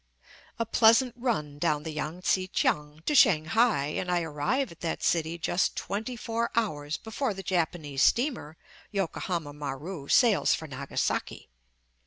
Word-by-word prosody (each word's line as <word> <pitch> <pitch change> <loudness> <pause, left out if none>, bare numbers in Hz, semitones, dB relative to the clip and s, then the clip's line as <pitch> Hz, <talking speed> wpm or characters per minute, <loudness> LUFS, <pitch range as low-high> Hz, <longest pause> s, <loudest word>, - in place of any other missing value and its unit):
A 230 - -1
pleasant 230 +2 +4
run 180 - -2
down 150 -2 +1
the 160 - -5
Yang 155 +3 -4
tsi 185 0 +1
kiang 150 -3 -1
to - - +1
Shanghai, 210 - +4
and 180 +4 -3
I 175 -1 +2
arrive 160 - -1
at 170 - -14
that 165 - -3
city 165 0 +1
just 175 +2 0
twenty 220 +5 -3
four 230 0 -2
hours 155 -10 -1
before 220 0 -3
the 195 - -7
Japanese 160 -6 -1
steamer, 235 - +1 0.3
Yokohama 175 -5 -3
Maru, 145 +2 -6
sails 230 - +4
for 160 - -7
Nagasaki. 140 - -3
175 Hz, 145 wpm, -28 LUFS, 150-225 Hz, 0.3 s, pleasant